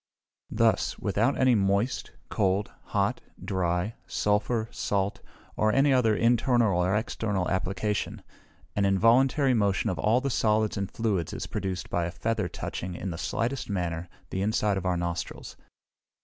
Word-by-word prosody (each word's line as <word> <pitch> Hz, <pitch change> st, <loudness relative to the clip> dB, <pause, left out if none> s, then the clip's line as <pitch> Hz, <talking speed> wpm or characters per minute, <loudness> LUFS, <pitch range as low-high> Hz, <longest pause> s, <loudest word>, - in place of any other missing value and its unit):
Thus, -, -, +1 dB
without 110 Hz, +7 st, +1 dB
any 130 Hz, -1 st, +4 dB
moist, 100 Hz, +4 st, +1 dB, 0.2 s
cold, 95 Hz, +2 st, 0 dB
hot, -, -, 0 dB, 0.2 s
dry, 90 Hz, +2 st, 0 dB
sulphur, 105 Hz, +2 st, 0 dB
salt, 100 Hz, 0 st, -1 dB, 0.3 s
or 110 Hz, 0 st, +2 dB
any 135 Hz, +3 st, +4 dB
other 115 Hz, -4 st, +3 dB
internal 115 Hz, -5 st, +3 dB
or 95 Hz, +3 st, +1 dB
external 105 Hz, -4 st, -1 dB
application, 100 Hz, +2 st, -2 dB, 0.5 s
an 100 Hz, -, +1 dB
involuntary 125 Hz, +8 st, +4 dB
motion 100 Hz, -5 st, +1 dB
of 90 Hz, -, -5 dB
all 110 Hz, +4 st, +3 dB
the 135 Hz, +1 st, -2 dB
solids 110 Hz, -2 st, +2 dB
and 100 Hz, -1 st, -2 dB
fluids 100 Hz, -8 st, -1 dB
is -, -, -4 dB
produced 95 Hz, -4 st, -4 dB
by 85 Hz, -1 st, +1 dB
a 85 Hz, -, -3 dB
feather 110 Hz, -1 st, -1 dB
touching, 90 Hz, 0 st, -5 dB
in 95 Hz, +1 st, -4 dB
the 80 Hz, -, -5 dB
slightest 120 Hz, +6 st, -2 dB
manner, 90 Hz, -3 st, -2 dB, 0.2 s
the 95 Hz, -, -2 dB
inside 105 Hz, 0 st, +1 dB
of 95 Hz, -1 st, -2 dB
our 90 Hz, -1 st, +1 dB
nostrils. 85 Hz, 0 st, -4 dB
105 Hz, 150 wpm, -27 LUFS, 95-115 Hz, 0.5 s, any